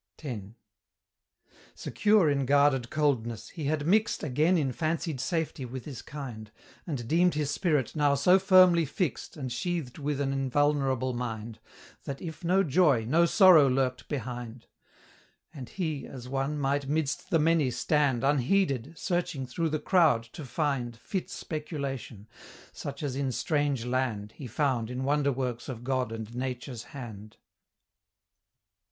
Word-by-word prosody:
X. 125 -8 -4 1.3
Secure 205 - +2
in 140 -3 +1
guarded 140 -3 +3
coldness, 125 -7 -1
he 160 -4 -6
had 145 0 0
mixed 215 +6 +2
Again 155 +6 +2
in 140 -5 0
fancied 160 -1 -2
safety 165 -5 -2
with 125 0 -7
his 135 -6 -7
kind, 120 -7 -8 0.4
And 130 -8 -4
deemed 175 +4 +3
his 150 -2 -1
spirit 150 - 0
now 145 -2 +3
so 180 +7 +5
firmly 185 -3 +6
fixed 155 - -3
And 130 -4 -4
sheathed 150 +1 -3
with 145 -1 -2
an 135 -1 0
invulnerable 135 -1 +1
mind, 115 -2 -5 0.5
That, 140 -1 -5
if 165 0 -8
no 185 +3 +3
joy, 150 - +3
no 165 +8 +3
sorrow 175 -8 +7
lurked 130 -1 -1
behind; 120 -3 -5 0.9
And 130 -5 -8
he, 160 -7 -3
as 125 -2 -9
one, 135 +3 -2
might 140 0 -1
midst 155 +3 -1
the 170 - +3
many 160 -3 +3
stand 135 0 +1
Unheeded, 145 0 +1
searching 175 -7 -2
through 160 +6 -2
the 155 - 0
crowd 155 -7 +3
to 155 - -7
find 130 -4 -2
Fit 185 - -4
speculation; 140 - -5 0.4
such 140 +1 -7
as 135 -3 -2
in 135 -1 -1
strange 145 -3 0
land 125 -5 -1
He 130 - -9
found 125 -2 0
in 125 +1 -4
wonder 140 +1 +2
works 125 -1 -3
of 120 -2 -6
God 130 -2 -1
and 115 0 -6
Nature's 125 -2 -4
hand. 110 -7 -9
140 Hz, 145 wpm, -28 LUFS, 125-155 Hz, 1.3 s, sorrow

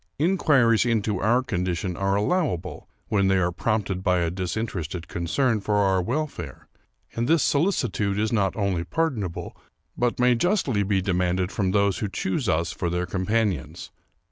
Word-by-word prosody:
Inquiries 145 - +3
into 110 -4 0
our 120 +6 +2
condition 90 -4 -2
are 95 +1 0
allowable 105 - -1 0.2
when 100 -2 +2
they 95 0 +3
are 90 -1 +1
prompted 100 -1 -1
by 90 -1 +2
a 85 -1 0
dis 90 +1 -3
interested 90 -6 -4
concern 110 +7 0
for 105 +1 -1
our 95 -2 +3
welfare; 115 - -4 0.5
and 115 +1 -1
this 165 0 +3
solicitude 125 - +1
is 110 +2 0
not 100 -4 +1
only 100 -5 0
pardonable, 110 - -2 0.4
but 120 0 0
may 125 0 +5
justly 135 - +1
be 95 -1 0
demanded 90 0 0
from 95 -3 0
those 100 0 +2
who 105 - -2
choose 100 +4 -2
us 85 0 +1
for 85 - -3
their 90 +1 -1
companions. 95 - -2
100 Hz, 160 wpm, -25 LUFS, 90-120 Hz, 0.5 s, may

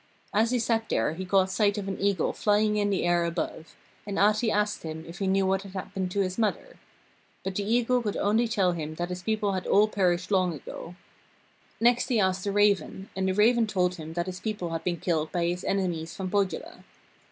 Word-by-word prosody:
As 220 +2 +3
he 250 - +1
sat 225 -1 0
there 115 +7 +1
he 185 +3 -5
caught 190 0 +3
sight 205 +1 +2
of 200 -1 -4
an 195 - -4
eagle 200 -4 +1
flying 210 0 +2
in 205 -1 +1
the 195 - 0
air 175 0 +2
above, 165 -1 -4 0.3
and 200 -1 -3
Ahti 215 +3 +3
asked 210 0 0
him 160 0 -6
if 170 +2 -9
he 195 - -1
knew 195 0 +2
what 190 0 +1
had 195 -1 -11
happened 190 -1 -4
to 200 +2 0
his 185 +2 -2
mother. 230 - -2 0.6
But 190 - -3
the 205 +3 -2
eagle 245 +1 +2
could 210 -3 -2
only 220 +4 +2
tell 200 -5 +2
him 155 -2 -4
that 175 +2 -3
his 180 0 -5
people 210 +1 0
had 185 -1 -3
all 210 +2 +5
perished 185 -3 0
long 180 -5 +1
go. 175 - -8 0.8
Next 240 +1 +3
he 240 -4 +2
asked 190 -1 +1
the 200 - 0
raven, 200 -1 +1
and 190 0 0
the 190 - 0
raven 225 +2 +4
told 180 -3 +1
him 160 0 -7
that 170 0 -1
his 185 -1 -6
people 205 -6 -3
had 165 0 -3
been 175 -1 -1
killed 160 -3 -1
by 175 -2 0
his 175 +1 -2
enemies 175 -4 -1
from 185 -1 -4
Pohjola. 200 -2 -2
195 Hz, 220 wpm, -27 LUFS, 180-210 Hz, 0.8 s, all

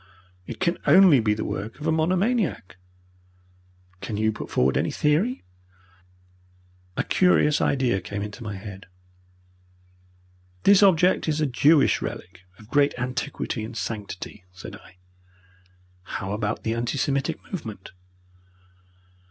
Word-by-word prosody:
It - - -7
can 175 -2 0
only 185 -8 +7
be 105 -2 +1
the 110 - -4
work 110 +7 -5
of 150 - -7
a 160 - +2
monomaniac." 180 - 0 1.2
"Can 105 - -4
you 110 +1 +2
put 110 - -8
forward 65 +1 +2
any - - +1
theory?" 170 - 0 1.5
A - - +1
curious 165 -5 +3
idea 125 -8 +1
came 100 +3 -5
into 105 +3 -8
my 105 -3 -5
head. 95 0 -9 1.8
"This 200 0 +6
object 185 -3 +4
is 155 0 0
a 155 - +2
Jewish 145 +3 +3
relic 90 +1 -7 0.2
of 110 - -16
great 145 -2 +2
antiquity 125 -2 -3
and 115 +1 -7
sanctity," 105 -3 -6
said 90 0 -10
I. 95 -1 -17 1.0
"How 95 +1 -5
about 105 0 -2
the 110 - -1
anti 120 +4 -2
Semitic 140 0 -1
movement? 110 - -7
125 Hz, 125 wpm, -24 LUFS, 105-160 Hz, 1.8 s, only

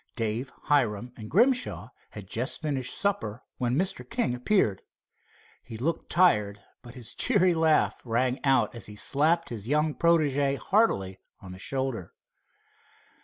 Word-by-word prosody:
Dave, 115 +2 -2
Hiram 120 -5 0
and 110 -2 -9
Grimshaw 255 - +1 0.2
had 105 -2 -9
just 120 - -3
finished 135 -5 -2
supper 155 - -2 0.2
when 125 -1 0
Mr. 185 +3 -1
King 230 - 0
appeared. 125 - +1 0.8
He 115 -2 -9
looked 160 +8 -2
tired, 105 - +2 0.2
but 120 0 -13
his 125 -3 -4
cheery 190 -7 +3
laugh 160 -1 +2
rang 125 +2 -1
out 135 -6 +2
as 115 -4 -5
he 105 - -10
slapped 160 +9 +2
his 110 -3 -6
young 150 +2 +1
protege 145 -5 +2
heartily 115 - +1 0.2
on 95 - -11
the 90 - -10
shoulder. 130 - -3
130 Hz, 140 wpm, -27 LUFS, 115-160 Hz, 0.8 s, cheery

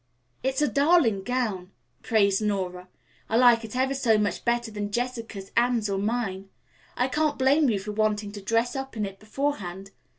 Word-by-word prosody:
"It's 265 +2 0
a - - +3
darling 285 - +3
gown," 210 -5 -2 0.3
praised 200 -3 +2
Nora. 185 -3 -2 0.4
"I 225 - +2
like 240 -2 +6
it 225 +1 -8
ever 265 +1 +1
so 245 -5 +2
much 210 -1 -1
better 235 -1 0
than 205 -1 -4
Jessica's, 230 -4 -4
Anne's 235 -3 +2
or 195 - -1
mine. 200 -3 -2 0.5
I 250 - +2
can't 300 +2 0
blame 275 +2 +4
you 215 - +1
for 200 +2 -5
wanting 210 -1 0
to 205 -1 -8
dress 230 +6 0
up 270 -3 -5
in 210 - 0
it 195 0 -8
beforehand. 205 -6 -4
225 Hz, 175 wpm, -26 LUFS, 200-255 Hz, 0.5 s, like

